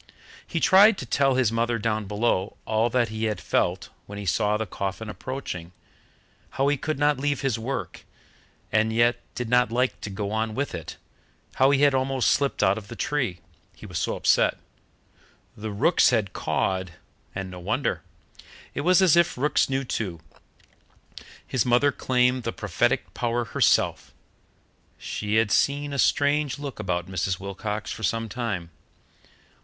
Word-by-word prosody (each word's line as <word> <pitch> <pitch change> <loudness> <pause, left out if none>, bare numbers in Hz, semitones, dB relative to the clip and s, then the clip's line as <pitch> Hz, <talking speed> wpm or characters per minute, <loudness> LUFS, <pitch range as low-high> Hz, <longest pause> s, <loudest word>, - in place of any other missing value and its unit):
He 165 - -2
tried 195 +5 +6
to 130 - -5
tell 135 +2 +2
his 125 -4 +2
mother 115 +1 0
down 110 -1 -1
below 105 -1 -1
all 110 +2 +1
that 120 -2 +1
he 110 0 -3
had 105 -4 -1
felt 90 +2 -1 0.2
when 100 - -8
he 100 - -6
saw 105 +3 +1
the 110 - -2
coffin 100 +3 -4
approaching: 105 -9 -6 0.8
how 135 +1 +3
he 145 - +2
could 155 +2 -3
not 145 -1 +2
leave 145 +1 -1
his 130 -5 0
work, 115 -6 -5 0.7
and 110 +1 +2
yet 120 +1 +3 0.2
did 125 - -3
not 125 0 +3
like 125 +2 0
to - - -5
go 100 +1 -4
on 110 0 -1
with 140 +3 -2
it; 80 -2 -7 0.6
how 130 +1 +5
he 140 0 +3
had 145 -1 +5
almost 130 -1 +1
slipped 140 -6 +1
out 100 +1 +3
of 100 - -14
the 115 - -8
tree, 125 - -2 0.3
he - - -12
was - - -4
so - - -1
upset; - - +3 1.0
the 110 +1 -6
rooks 105 - +3
had 110 -6 0
cawed, 95 -2 -1 0.4
and 95 -1 -4
no 90 - -8
wonder 90 - -1 0.7
it - - -3
was 180 +4 +4
as 175 -4 +5
if 170 -3 +3
rooks 145 +2 +2
knew 135 0 0
too. 95 -9 -3 1.3
His 130 - 0
mother 125 +4 +3
claimed 125 -1 +1
the - - -3
prophetic - - -1
power 120 0 -1
herself - - +1 0.8
she 105 0 -3
had 110 -2 +3
seen 145 +1 +1
a 140 - -3
strange 145 -1 +2
look 145 -4 -7
about 90 -4 -2
Mrs. 95 0 -2
Wilcox 105 +2 -4
for - - -7
some 115 +3 -1
time. 100 -7 -4
115 Hz, 165 wpm, -25 LUFS, 105-135 Hz, 1.3 s, tried